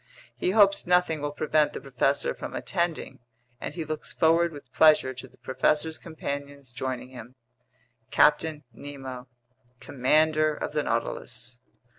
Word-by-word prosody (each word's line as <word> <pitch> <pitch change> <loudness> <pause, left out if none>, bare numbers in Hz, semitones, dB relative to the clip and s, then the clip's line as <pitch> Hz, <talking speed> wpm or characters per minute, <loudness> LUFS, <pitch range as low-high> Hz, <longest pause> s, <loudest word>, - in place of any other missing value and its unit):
He - - -1
hopes 200 -2 +4
nothing 180 -4 +2
will 145 0 -2
prevent 150 0 +1
the - - -5
professor 135 +1 0
from - - -7
attending, 170 -3 -2 0.4
and 150 - -6
he 165 -3 -4
looks 155 0 -5
forward 165 +1 +3
with 140 -4 -13
pleasure 155 -4 +5
to 130 - -9
the - - -24
professor's 150 +4 0
companions 140 -4 -6
joining 125 +1 -4
him. 125 -1 -11 0.7
CAPTAIN 150 0 +3
NEMO, 130 -1 -8 0.5
Commander 155 +3 +2
of - - -4
the - - 0
Nautilus. 120 0 -4
150 Hz, 135 wpm, -27 LUFS, 130-160 Hz, 0.7 s, pleasure